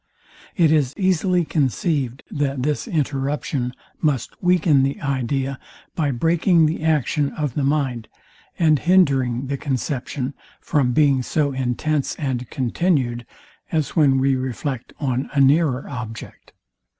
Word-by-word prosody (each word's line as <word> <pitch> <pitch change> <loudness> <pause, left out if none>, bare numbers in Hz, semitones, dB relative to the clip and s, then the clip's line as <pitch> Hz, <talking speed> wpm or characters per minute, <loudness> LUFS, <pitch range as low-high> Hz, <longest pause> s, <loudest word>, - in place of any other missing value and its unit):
It 165 -4 +4
is 145 -4 +2
easily 185 -2 +2
conceived, 135 - -1
that 140 -3 -1
this 150 +1 -1
interruption 140 -3 -1 0.3
must 145 -7 0
weaken 175 -6 +3
the 135 +1 -1
idea 135 0 -2 0.3
by 155 -4 0
breaking 165 +5 +3
the 155 +1 -1
action 150 -2 +1
of 150 -5 -2
the 145 - -1
mind, 135 -5 0 0.5
and 155 -4 +3
hindering 135 -8 +2
the 140 +1 -3
conception 135 -1 -3 0.3
from 140 -6 +1
being 140 -2 +3
so 145 +3 0
intense 135 +3 -1
and 130 -5 -3
continued, 130 -3 0 0.4
as 155 -3 -1
when 145 -5 +4
we 135 0 +2
reflect 130 0 -4
on 130 -2 -1
a - - +3
nearer 140 -1 +3
object. 120 -4 -8
140 Hz, 125 wpm, -22 LUFS, 130-155 Hz, 0.5 s, It